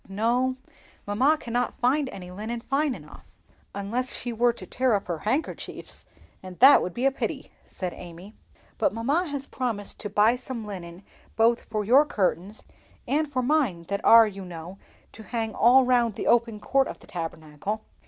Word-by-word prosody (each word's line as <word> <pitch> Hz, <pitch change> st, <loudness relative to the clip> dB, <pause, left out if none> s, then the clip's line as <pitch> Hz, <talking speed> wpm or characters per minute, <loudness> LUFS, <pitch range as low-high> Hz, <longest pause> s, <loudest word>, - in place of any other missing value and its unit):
"No, 240 Hz, +6 st, +1 dB, 0.5 s
mamma 255 Hz, +10 st, +2 dB
cannot 245 Hz, -1 st, -2 dB
find 265 Hz, +3 st, +2 dB
any 180 Hz, -4 st, -9 dB
linen 220 Hz, +5 st, -5 dB
fine 275 Hz, +1 st, 0 dB
enough, 150 Hz, -5 st, -13 dB, 0.5 s
unless 230 Hz, +6 st, -2 dB
she 240 Hz, -, -5 dB
were 240 Hz, +2 st, +3 dB
to 230 Hz, -5 st, -10 dB
tear 255 Hz, +4 st, +1 dB
up 200 Hz, -, -2 dB
her 170 Hz, -3 st, -4 dB
handkerchiefs, 260 Hz, -, -4 dB, 0.3 s
and 185 Hz, -1 st, -10 dB
that 270 Hz, +4 st, +8 dB
would 180 Hz, -, -4 dB
be 245 Hz, -, -1 dB
a 275 Hz, -, +5 dB
pity," 270 Hz, -, -4 dB
said 180 Hz, -2 st, -5 dB
Amy. 175 Hz, +4 st, -11 dB, 0.5 s
"But 295 Hz, -, +2 dB
mamma 285 Hz, +11 st, 0 dB
has 280 Hz, -2 st, -4 dB
promised 230 Hz, -8 st, -4 dB
to 210 Hz, -, -5 dB
buy 210 Hz, +4 st, +4 dB
some 245 Hz, -3 st, -6 dB
linen 180 Hz, -2 st, -8 dB, 0.3 s
both 230 Hz, +1 st, +3 dB
for 215 Hz, -1 st, -2 dB
your 260 Hz, +7 st, +6 dB
curtains 200 Hz, -, -2 dB, 0.4 s
and 300 Hz, +1 st, 0 dB
for 255 Hz, -2 st, -1 dB
mine 250 Hz, -, +1 dB
that 200 Hz, +1 st, -2 dB
are, 230 Hz, 0 st, +8 dB
you 195 Hz, -2 st, -6 dB
know, 175 Hz, +1 st, -9 dB, 0.3 s
to 220 Hz, -, -12 dB
hang 225 Hz, -1 st, -3 dB
all 250 Hz, +3 st, +5 dB
round 240 Hz, -4 st, +2 dB
the -, -, -4 dB
open 230 Hz, -2 st, +2 dB
court 270 Hz, +5 st, +1 dB
of -, -, -7 dB
the -, -, -18 dB
Tabernacle." 165 Hz, +4 st, -5 dB
225 Hz, 175 wpm, -26 LUFS, 195-255 Hz, 0.5 s, that